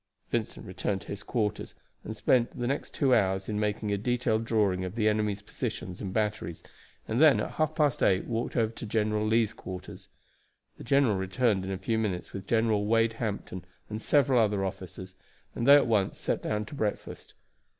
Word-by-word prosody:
Vincent 115 -2 -2
returned 95 0 -2
to - - -14
his 100 0 -5
quarters, 105 -3 -2 0.3
and - - -6
spent 120 -2 +2
the 120 - -1
next 140 +4 -2
two 135 -3 +2
hours 95 -4 +2
in 105 -1 -2
making 105 0 -1
a 100 - 0
detailed 115 -1 0
drawing 100 -5 +1
of 90 +2 -5
the 110 -2 +1
enemy's 105 -1 0
positions 90 -3 -5
and 95 -3 -4
batteries, 105 -5 -2 0.4
and 115 +5 0
then 155 -3 +7
at - - -3
half 155 0 -1
past 150 -5 +1
eight 95 -1 +3
walked 115 +1 -3
over 115 -1 +1
to 115 - -7
General 105 0 0
Lee's 110 0 +2
quarters. 95 -3 -9 0.7
The - - -8
general 130 -4 +3
returned 95 +1 0
in 95 - -4
a 95 - -2
few 110 +4 -1
minutes 95 -5 -3
with 100 -1 -7
General 110 -3 +2
Wade 115 0 +3
Hampton 100 -4 -4 0.3
and 110 +1 -4
several 135 0 +3
other 105 -3 +2
officers, 95 0 -7 0.4
and 120 - -2
they 140 - +10
at 145 - +5
once 105 -5 +1
sat - - -1
down 105 0 -2
to 105 - -11
breakfast. 110 -7 -4
105 Hz, 190 wpm, -28 LUFS, 100-115 Hz, 0.7 s, they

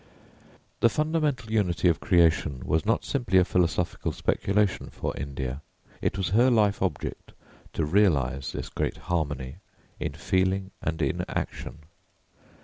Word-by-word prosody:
The 115 - +5
fundamental 150 -4 0
unity 95 -5 +2
of 85 - +3
creation 80 - +2
was 80 +6 0
not 115 - +1
simply 120 -8 +1
a 90 - +6
philosophical 90 -1 0
speculation 100 -1 0
for - - -4
India; 70 -1 -4 0.4
it - - 0
was 95 -3 -1
her 120 +7 +5
life 105 -4 +3
object - - -3 0.4
to 80 - 0
realise 75 -7 +2
this - - -5
great - - -2
harmony 70 -5 -3 0.4
in - - -3
feeling 95 +1 0
and 80 0 -2
in - - 0
action. 75 - -5
90 Hz, 135 wpm, -27 LUFS, 75-105 Hz, 0.4 s, a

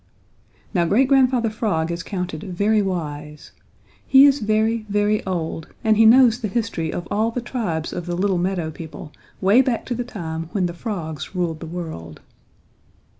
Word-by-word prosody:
Now 175 - +2
Great 235 +10 +3
Grandfather 255 -4 +3
Frog 185 -7 -1
is 170 0 -3
counted 180 -5 -4
very 205 +3 +1
wise. 150 -6 -5 0.6
He 270 +1 +8
is 285 0 +4
very, 220 +1 +1
very 205 +1 +1
old 165 -3 -3 0.2
and 220 -1 +4
he 220 +1 +6
knows 240 0 +6
the 225 - -2
history 205 -7 -2
of 175 -1 -5
all 215 +2 +1
the 230 - -3
tribes 220 -10 -3
of 175 0 -5
little 185 +1 0
meadow 175 -3 -1
people 155 -1 -9 0.3
way 200 +7 +5
back 250 -3 -1
to 250 - -3
the 245 +1 -2
time 165 -8 -6
when 190 -3 +1
the 175 - -3
frogs 170 -5 -5
ruled 170 -3 -1
the 165 - -7
world. 160 - -7
190 Hz, 170 wpm, -22 LUFS, 165-225 Hz, 0.6 s, He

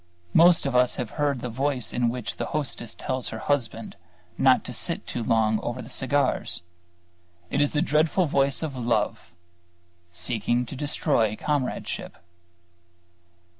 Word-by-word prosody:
Most 170 -1 +6
of 135 -2 -1
us 125 0 +4
have 120 -3 -4
heard 145 -4 0
the 125 - -3
voice 130 +1 -1
in 120 -1 +2
which 120 -1 -4
the - - -3
hostess 120 -6 -3
tells 130 -1 -2
her 110 - -5
husband 115 -4 -2 0.4
not - - +4
to - - -7
sit - - -1
too 120 - -3
long 110 -2 +2
over 120 +1 -4
the 125 +1 -8
cigars. 135 -8 0 0.9
It - - +2
is 145 - +2
the 150 +1 +2
dreadful 160 +3 +2
voice 140 0 +1
of 150 -4 -3
Love, 115 -4 -1 0.8
seeking 115 +7 0
to 120 - -7
destroy 135 - +1
Comradeship. 145 +1 -2
125 Hz, 145 wpm, -26 LUFS, 115-145 Hz, 0.9 s, Most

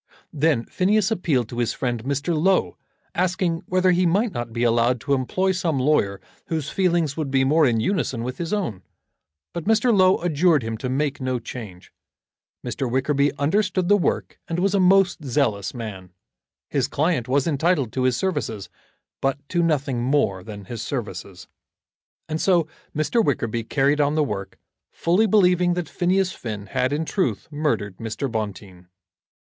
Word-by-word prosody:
Then 150 -5 +1
Phineas 205 +3 +1
appealed 150 - +1
to 120 - -5
his 120 - 0
friend 120 -4 -2
Mr. 140 +5 -1
Low, 185 +5 +2 0.4
asking 180 -2 0
whether 185 0 +3
he 180 0 +3
might 205 +6 +2
not 120 -6 -5
be 115 +1 -2
allowed 120 +1 +2
to 140 - 0
employ 185 +9 +1
some 175 -5 -1
lawyer 125 -8 +1 0.3
whose 155 -3 -3
feelings 170 -6 +1
would 155 -4 -3
be 135 0 +2
more 150 +2 +4
in 115 -2 +1
unison 120 - -1
with 125 +1 -5
his 170 -1 -3
own. 180 - -2 0.7
But 170 - -5
Mr. 225 +2 +3
Low 185 -1 +5
adjured 160 -3 +3
him 115 0 -3
to 130 - -3
make 140 +1 -1
no 130 -1 -1
change. 110 -6 -9 0.7
Mr. 130 - -2
Wickerby 140 +3 +1
understood 185 +4 +1
the 205 - +7
work 195 - -1
and 165 - -2
was 190 +2 +1
a 200 - +3
most 185 -2 +4
zealous 120 -8 0
man. 100 -6 -7 0.6
His 135 -3 0
client 145 -3 0
was 135 +1 +2
entitled 150 -5 +1
to 130 - -1
his 125 -2 +2
services, 115 - -2 0.5
but 135 0 +1
to 175 - +1
nothing 140 -7 0
more 120 -8 +1
than 105 -2 -9
his 115 +3 -6
services. 100 -7 -5 0.8
And 155 +1 -3
so 175 -5 +3 0.3
Mr. 155 +10 +1
Wickerby 115 - -1
carried 140 +4 +2
on 145 +1 +1
the 155 - +3
work, 100 -8 -5 0.3
fully 185 +7 +2
believing 180 -3 +3
that 175 -3 -3
Phineas 185 +3 +1
Finn 105 - -6
had 130 +5 -1
in 150 +3 -1
truth 145 - -1
murdered 145 -11 -1
Mr. 115 +5 -3
Bonteen. 100 -5 -5
145 Hz, 165 wpm, -23 LUFS, 120-175 Hz, 0.8 s, the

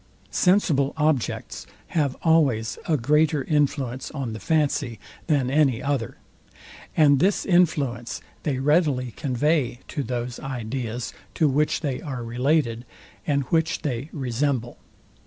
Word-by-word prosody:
Sensible 165 -8 +3
objects 150 -5 -1 0.2
have 145 -5 0
always 140 -9 +2
a 155 - +3
greater 150 +3 +2
influence 135 -4 0
on 135 -7 -4
the 110 - -6
fancy 145 - 0 0.3
than 140 -6 +1
any 135 -5 +3
other; 135 -4 -2 0.8
and 145 -3 +6
this 190 +6 +2
influence 145 - +1 0.2
they 140 -4 -1
readily 140 -3 +2
convey 135 0 0
to 145 - -2
those 120 -1 -4
ideas, 125 -2 -4 0.2
to 155 - +3
which 145 +2 +1
they 140 -5 -2
are 130 -5 -5
related, 120 0 0 0.4
and 140 -1 +2
which 160 -1 +1
they 135 0 -3
Resemble. 130 -2 -2
140 Hz, 120 wpm, -24 LUFS, 125-150 Hz, 0.8 s, and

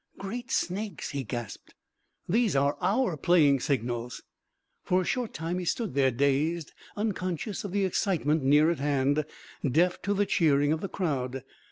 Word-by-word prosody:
"Great 235 +5 -6
snakes!" 200 +3 -2
he 140 -2 -3
gasped. 120 -2 -7 0.5
"These 215 -2 +2
are 140 +1 +2
our 225 -4 +1
playing 150 -3 +4
signals!" 120 -2 -2 0.6
For 185 - +2
a - - -3
short 245 +1 -1
time 165 +3 -3
he 180 - -4
stood 220 - -1
there 135 -1 +3
dazed, 140 +6 0 0.2
unconscious 205 0 -2
of 200 - -5
the 200 0 +1
excitement 165 -5 +1
near 150 +4 +4
at 170 - -3
hand, 145 +1 +1 0.4
deaf 165 +7 +2
to 205 0 0
the 205 +1 +2
cheering 145 -5 +3
of 160 - -3
the 195 - -4
crowd. 135 -8 -2
160 Hz, 160 wpm, -28 LUFS, 140-195 Hz, 0.6 s, playing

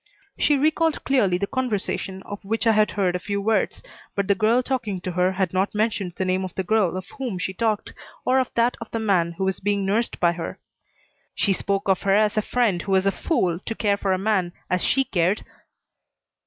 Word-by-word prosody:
She 295 - +3
recalled 315 +2 +1
clearly 210 -10 +2
the 200 - -1
conversation 205 -5 -2
of 205 0 -8
which 225 +4 -1
I 225 - +6
had 215 -1 +3
heard 185 -3 0
a - - -1
few 200 +2 -3
words, 210 0 0 0.3
but 200 -1 0
the 200 - +5
girl 220 +5 +2
talking 245 -8 -2
to 180 - -3
her 180 +1 +1
had 185 -2 -1
not 190 +3 0
mentioned 210 -4 0
the 190 - -2
name 185 +1 0
of 185 - -6
the 190 - -1
girl 185 -2 +1
of 185 - -6
whom 245 -8 -3
she 185 +1 -3
talked, 215 +1 -1 0.3
or 260 +1 +4
of 255 - -1
that 235 +1 +3
of 230 - -7
the - - -3
man 185 -6 +1
who 180 - -4
was 190 -1 0
being 200 0 0
nursed 215 +5 0
by 170 - +4
her. 170 -1 -5 0.8
"She 200 - +2
spoke 195 +1 -1
of 190 -2 +2
her 195 0 +3
as 215 +1 +3
a 215 - +2
friend 215 -6 +1
who 200 - -5
was 190 0 +3
a 195 - +4
fool 180 - 0
to 225 - -5
care 205 -3 +1
for 200 -1 -1
a 185 - +2
man 190 -3 0 0.2
as 180 -1 +1
she 270 - +3
cared." 185 -2 0
200 Hz, 225 wpm, -24 LUFS, 185-225 Hz, 0.8 s, I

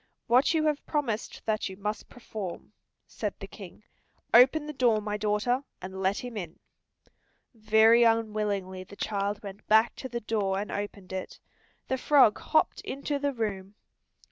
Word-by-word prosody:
"What 255 +7 +4
you 310 -1 +2
have 300 -1 0
promised 245 -8 -2
that 215 -2 -1
you 190 - -9
must 210 +1 -4
perform," 215 -7 -7 0.3
said - - -4
the - - -6
King. - - -12 0.5
"Open 265 +6 +6
the 300 - -6
door, 240 -5 +3
my 210 0 -3
daughter, 210 +5 0 0.2
and 190 +1 -7
let 195 +2 +1
him 245 -2 -7
in." 175 -6 -6 1.0
Very 220 +1 +5
unwillingly 210 -5 +1
the 200 +2 -13
child 205 0 -2
went 200 0 -9
back 220 +2 +4
to 260 - -6
the 240 0 -3
door 205 -3 -1
and 205 +2 -4
opened 200 -2 -5
it; 190 -1 -5 0.5
the 260 - -1
frog 260 -8 +5
hopped 315 - +1
into 280 +1 -3
the 285 0 0
room. 205 -5 -4
215 Hz, 160 wpm, -28 LUFS, 200-245 Hz, 1.0 s, Open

